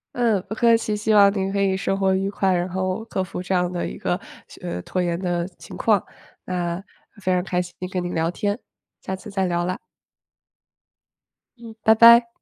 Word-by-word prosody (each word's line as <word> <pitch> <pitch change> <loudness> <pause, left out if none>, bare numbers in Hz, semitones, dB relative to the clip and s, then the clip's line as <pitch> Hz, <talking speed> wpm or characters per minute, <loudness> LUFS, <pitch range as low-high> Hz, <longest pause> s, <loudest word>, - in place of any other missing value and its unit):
嗯， 230 -5 +2
不 215 - -5
客 230 0 +5
气， 220 -2 -2
希 215 +1 0
望 200 -1 +7
您 195 0 -1
可 200 0 0
以 190 -1 +2
生 195 0 -1
活 190 -1 +2
愉 195 +1 0
快， 195 -1 +1
然 175 0 0
后 185 +3 -2
克 190 -4 -2
服 185 -1 -6
这 185 - -2
样 180 -1 +1
的 175 -1 -2
一 - - -7
个， - - -1 0.4
呃， 90 - -4
拖 185 - -2
延 170 -1 -1
的 175 -2 -1
情 - - -10
况， 210 -4 +2 0.4
那 175 -1 -2 0.4
非 185 - 0
常 180 -1 +2
开 180 -1 0
心 175 0 -8 0.2
跟 180 -1 -2
您 175 - -4
聊 165 +1 +1
天， 205 +2 -1 0.4
下 190 - -4
次 190 +3 -11
再 195 -2 0
聊 175 -1 0
啦。 185 +2 -2 1.8
嗯， 230 -2 -11
拜 220 - +6
拜。 235 +1 +8
190 Hz, 215 characters per minute, -23 LUFS, 180-210 Hz, 1.8 s, 拜